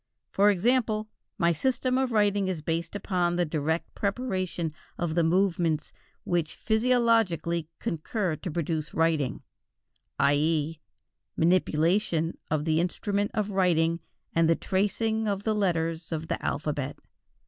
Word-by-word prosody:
For 200 +1 +4
example, 215 +1 +1 0.3
my 170 0 +3
system 255 - 0
of 260 -2 0
writing 205 -3 +2
is 175 -5 -3
based 165 +3 -2
upon 180 -3 0
the 175 0 +2
direct 160 +1 -2
preparation 185 -7 -2 0.2
of 170 -2 -1
the 170 0 +2
movements 170 -3 +1 0.3
which 170 -3 -1
physiologically 220 -9 +2
concur 170 +2 -2
to 180 - -6
produce 160 -1 -2
writing: 160 -5 +1 0.7
i.e. 150 +2 +2 0.6
manipulation 165 0 +2
of 155 -1 0
the 160 -1 +2
instrument 200 +3 -1
of 210 -1 0
writing 170 -3 +2 0.3
and 165 -1 +3
the 165 - +5
tracing 220 +4 0
of 200 -1 -1
the 220 - +1
letters 165 -5 -1
of 160 0 -3
the - - -2
alphabet. 145 -2 -2
175 Hz, 125 wpm, -27 LUFS, 160-205 Hz, 0.7 s, the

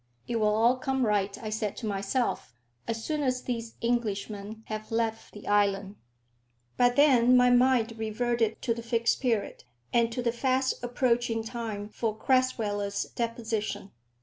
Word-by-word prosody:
"It 235 - -1
will 210 -1 +2
all 235 +3 +4
come 265 -1 0
right," 205 -2 0
I 215 - -4
said 215 -2 -2
to 235 - -5
myself, 200 - -2 0.3
"as 225 -1 -3
soon 305 -1 -1
as 255 -2 0
these 230 -2 -4
Englishmen 215 -2 -2
have 215 0 -6
left 225 -1 -1
the 210 - -11
island." 200 -1 +1 0.8
But 245 0 +3
then 255 -4 +6
my 250 0 +5
mind 245 -2 +3
reverted 225 0 -1
to 235 - +1
the 235 - -6
Fixed 230 0 0
Period, 230 -6 -1 0.3
and 235 -1 +3
to 245 +2 -3
the 235 - +2
fast 260 +1 0
approaching 240 -2 0
time 220 -3 -5
for 215 0 -3
Crasweller's 210 -6 0
deposition. 225 -4 -3
230 Hz, 150 wpm, -28 LUFS, 215-245 Hz, 0.8 s, then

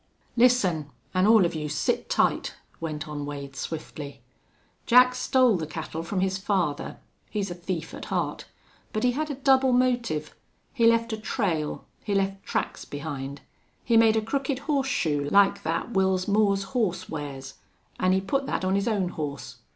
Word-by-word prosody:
"Listen. 200 - +3 0.2
An' 185 +1 +3
all 220 -4 +7
of 170 - -1
you 150 -2 -3
sit 145 -2 -1
tight," - - +1 0.2
went 155 -1 -4
on 150 -1 -5
Wade, 140 -1 -6
swiftly. 150 -2 -6 0.6
"Jack 250 +1 +7
stole 255 -3 +3
the 160 -2 -4
cattle 160 +1 -5
from 185 +3 -2
his 190 0 0
father. 185 -7 -1 0.3
He's 200 -3 -2
a - - -2
thief 175 -1 -5
at - - -7
heart. - - -2 0.5
But 215 - -1
he 250 - +4
had 305 +4 -2
a 285 - -3
double 265 -1 +4
motive. 245 -12 +1 0.4
He 235 -4 +4
left 230 0 +3
a - - -2
trail 190 - -2 0.2
he 205 -2 -1
left 195 0 0
tracks - - -2
behind. 140 -1 -6 0.4
He 235 - +2
made 225 -1 +6
a 220 - +1
crooked 270 +3 -1
horseshoe, 250 - 0
like 200 +2 +4
that 165 +9 -2
Wils 190 -1 +2
Moore's 200 -1 +3
horse 185 -7 0
wears, 135 -3 -7 0.4
an' 185 0 +3
he 190 0 +3
put 270 +8 -1
that - - -1
on 185 - +1
his 200 +2 +1
own 200 -5 +1
horse. 140 -6 -6
190 Hz, 170 wpm, -26 LUFS, 155-230 Hz, 0.6 s, all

